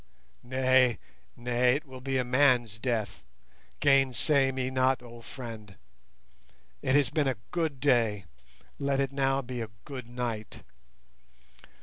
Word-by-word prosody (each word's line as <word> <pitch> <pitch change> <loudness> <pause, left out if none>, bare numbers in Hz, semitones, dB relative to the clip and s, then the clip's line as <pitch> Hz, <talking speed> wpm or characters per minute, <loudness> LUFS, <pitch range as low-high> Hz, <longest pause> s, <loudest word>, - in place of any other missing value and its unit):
Nay, 130 -1 +3 0.4
nay, 125 +1 +2
it 155 +3 -4
will 130 -2 -11
be 135 0 -1
a 130 - +1
man's 125 -4 +2
death: 110 -3 -2 0.6
gainsay 135 0 +3
me 130 0 -2
not, 130 0 +2
old 120 -1 -12
friend. 110 -6 -9 1.1
It 130 - +1
has 145 -3 +3
been 150 -3 +1
a 130 - 0
good 160 -6 -1
day, 115 -8 +2 0.5
let 140 -1 0
it 135 -1 0
now 135 0 +1
be 125 -1 -4 0.2
good 130 -5 -7
night. 120 -4 -5
130 Hz, 125 wpm, -29 LUFS, 120-135 Hz, 1.1 s, Nay